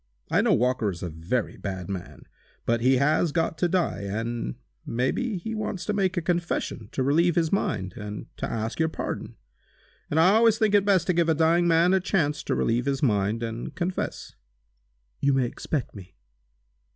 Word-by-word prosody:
I - - +4
know - - +3
Walker 125 -2 +1
is 90 -2 -6
a 90 - -3
very 85 +10 -2
bad 95 -3 -5
man, 95 -3 -7 0.4
but 115 0 +1
he 130 +2 +4
has 150 +4 +2
got 165 +1 0
to 175 - +3
die, 180 -1 0
and 115 - -3 0.3
may 125 +3 0
be 240 -5 -2
he 220 +6 -5
wants 215 -4 -3
to 210 - -1
make 190 -2 0
a 175 - 0
confession 170 - -2
to 130 - 0
relieve 165 +5 +3
his 165 -2 +1
mind, 95 - -1
and 105 0 -6
to - - -3
ask 115 +3 -3
your 160 0 +2
pardon. - - -5 0.7
And 155 - +1
I 180 +4 +6
always 225 0 +5
think 220 -2 +2
it 200 -1 +4
best 190 -4 +3
to 180 - +2
give 170 -1 +2
a 160 - +3
dying 165 +2 +3
man 170 +2 +4
a 190 - +4
chance 160 -6 0
to - - 0
relieve 120 +2 +1
his 135 0 -1
mind, 105 -1 +1
and 115 0 -5
confess." 180 +1 -3 0.9
"You 140 0 +2
may 135 -2 +2
expect 135 +3 -3
me!" 95 -3 -12
150 Hz, 195 wpm, -26 LUFS, 115-175 Hz, 0.9 s, I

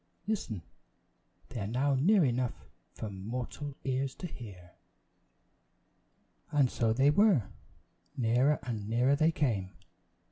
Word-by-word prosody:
Listen! 120 - -3 0.9
they - - -5
are 100 - -3
now 130 +6 +1
near 175 +7 +4
enough 125 -1 -1 0.3
for 110 - -6
mortal 125 +8 -5
ears 135 0 -1
to - - -7
hear!" 100 - -9 1.8
And 140 -4 +3
so 115 -2 +1
they 135 +5 +4
were; 175 - +4 0.7
nearer 125 +5 +3
and 110 -4 -4
nearer 125 +5 +3
they 155 +3 +3
came. 110 - -1
125 Hz, 115 wpm, -31 LUFS, 110-145 Hz, 1.8 s, near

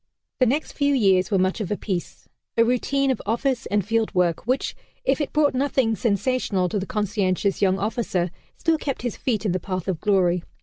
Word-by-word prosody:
The 255 - +4
next 290 +6 0
few 285 -1 +1
years 190 -6 +3
were 200 - +2
much 185 +4 +1
of 200 - -3
a 210 - -1
piece 185 -5 -5 0.3
a 230 - +5
routine 270 +3 +1
of 260 - -2
office 245 +3 0
and 205 -2 0
field 225 -1 0
work 180 +2 +1
which, 255 +2 0 0.3
if 410 - +2
it 290 - -2
brought 300 -2 +3
nothing 260 -4 +1
sensational 205 -3 0
to 205 - -1
the 190 - -5
conscientious 200 -2 0
young 190 -1 +3
officer, 200 -4 -1 0.3
still 325 -1 +1
kept 275 -4 -3
his 245 - -2
feet 225 -4 -1
in 200 - +2
the 185 - 0
path 185 0 -4
of 185 -5 -1
glory. 185 -4 +2
210 Hz, 205 wpm, -24 LUFS, 190-255 Hz, 0.3 s, a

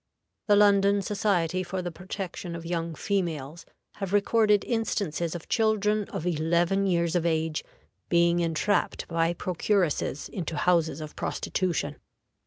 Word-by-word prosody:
The 205 - +6
London 200 -1 +4
Society 185 -4 0
for 185 0 -4
the 175 - -3
Protection 185 0 -6
of 170 0 -7
Young 165 -1 -2
Females 170 -7 -3 0.3
have 195 -2 -4
recorded 210 0 +3
instances 195 -8 -1
of 170 - -7
children 215 -1 +2
of 160 - -5
eleven 175 +4 +1
years 170 -2 +1
of 175 - +2
age 160 -2 0 0.5
being 170 0 +3
entrapped 170 +5 0
by 165 0 0
procuresses 180 -5 0
into 165 -4 -5
houses 165 -3 +2
of 155 -1 -8
prostitution. 185 -4 -2
175 Hz, 130 wpm, -27 LUFS, 165-200 Hz, 0.5 s, The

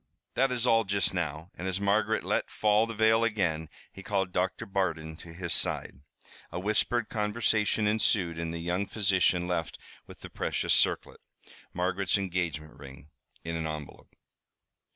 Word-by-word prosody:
"That 135 +1 +2
is 125 -1 -1
all 115 -2 +4
just 100 -1 +1
now," 80 0 -3
and 90 - -6
as 95 +1 -2
Margaret 100 +2 +1
let - - -1
fall 105 +1 +2
the 115 - -6
veil 110 +1 +4
again, 85 -9 0 0.2
he 95 - -11
called 95 -2 -1
Doctor 90 +1 -1
Bardon 80 -5 -2
to 85 - -11
his 85 0 -3
side. - - +1 0.5
A - - -3
whispered 110 +4 +1
conversation 105 0 +1
ensued, 100 -5 +2
and 85 -1 -3
the 85 - -4
young 90 +4 -2
physician 95 -4 +2
left 85 -3 -2 0.3
with - - -13
the - - -8
precious - - 0
circlet - - +2 0.5
Margaret's 95 +2 +1
engagement 85 -6 -3
ring 70 +1 -12 0.3
in 85 0 -4
an 80 -1 -2
envelope. 75 -2 -8
95 Hz, 155 wpm, -29 LUFS, 85-105 Hz, 0.5 s, all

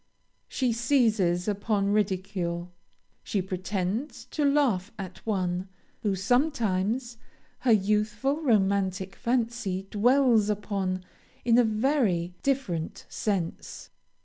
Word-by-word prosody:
She 255 -3 0
seizes 220 -8 +2
upon 205 -1 0
ridicule. 185 -4 -1 0.5
She 205 - -1
pretends 190 +6 -3
to 300 - -1
laugh 265 -9 +2
at 185 -2 -8
one, 185 -2 -1 0.3
whom 205 -3 0
sometimes 235 - 0 0.4
her 250 -1 +2
youthful 215 +7 +1
romantic 195 - +1
fancy 230 -5 -1
dwells 235 -1 +4
upon 195 -3 -2 0.4
in 235 0 +5
a - - +6
very 215 - +1
different 255 - -2
sense. 190 -6 -3
210 Hz, 95 wpm, -27 LUFS, 185-240 Hz, 0.5 s, a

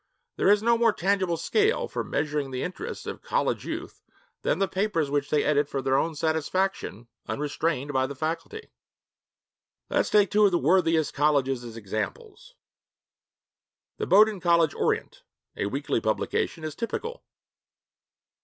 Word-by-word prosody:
There - - +2
is 205 +1 +4
no 235 0 +3
more 230 -2 +4
tangible 190 -3 0
scale 430 - +1
for - - -3
measuring 145 -2 -2
the 130 -1 -3
interests 435 - -6
of - - -6
college - - -1
youth - - -6 0.4
than - - +1
the 195 - +1
papers 190 -8 -1
which 145 0 0
they 150 - +2
edit 145 -1 +2
for 140 - -2
their 130 0 +1
own 160 +3 +1
satisfaction, 160 - -1 0.2
unrestrained 145 -1 -2
by 130 0 +2
the 140 - -7
faculty. 165 - -4 1.2
Let - - +2
us - - +1
take 205 -2 +4
two 210 +1 +4
of 200 - +4
the 175 - +3
worthiest 165 0 +2
colleges 140 -4 +1
as 115 -1 -9
examples. 440 - -6 1.4
The - - -2
Bowdoin 210 0 +5
College 170 -3 +3
Orient, - - -1 0.3
a - - -1
weekly 135 0 -1
publication, 110 +8 -1
is 155 -1 -4
typical. 465 - -5
160 Hz, 150 wpm, -26 LUFS, 140-200 Hz, 1.4 s, Bowdoin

